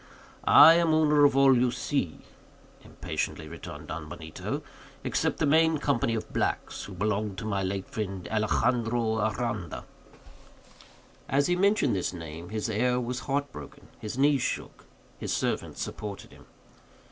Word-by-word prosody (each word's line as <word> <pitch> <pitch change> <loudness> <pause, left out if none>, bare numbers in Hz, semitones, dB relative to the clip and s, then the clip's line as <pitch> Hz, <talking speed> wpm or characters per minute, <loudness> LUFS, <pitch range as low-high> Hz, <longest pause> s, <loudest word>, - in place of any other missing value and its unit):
"I 160 +2 +10
am 165 -2 +3
owner 150 -2 +5
of 140 -1 +3
all 135 -1 +6
you 125 +1 +3
see," 120 - -2 0.6
impatiently 80 - -4
returned 85 +1 -9
Don 75 -1 -6
Benito, 80 0 -6 0.4
"except - - 0
the - - +1
main 160 +2 +4
company 135 -5 0
of 110 - -5
blacks, - - -2
who 100 - -9
belonged 105 +1 -1
to - - -5
my 100 -2 -1
late 95 0 -3
friend, 95 -5 -5
Alexandro 115 +1 +1
Aranda." 110 -4 -2 1.4
As 140 +1 +2
he 180 - +2
mentioned 195 - +2
this 95 -1 -2
name, 85 0 -8
his 110 +1 -3
air 125 +3 +1
was 125 0 -3
heart 140 +3 -2
broken; - - -11
his 110 +3 -6
knees 140 -1 +3
shook; - - -4 0.3
his - - -4
servant - - -2
supported 100 -2 -6
him. - - -17
115 Hz, 145 wpm, -28 LUFS, 100-140 Hz, 1.4 s, I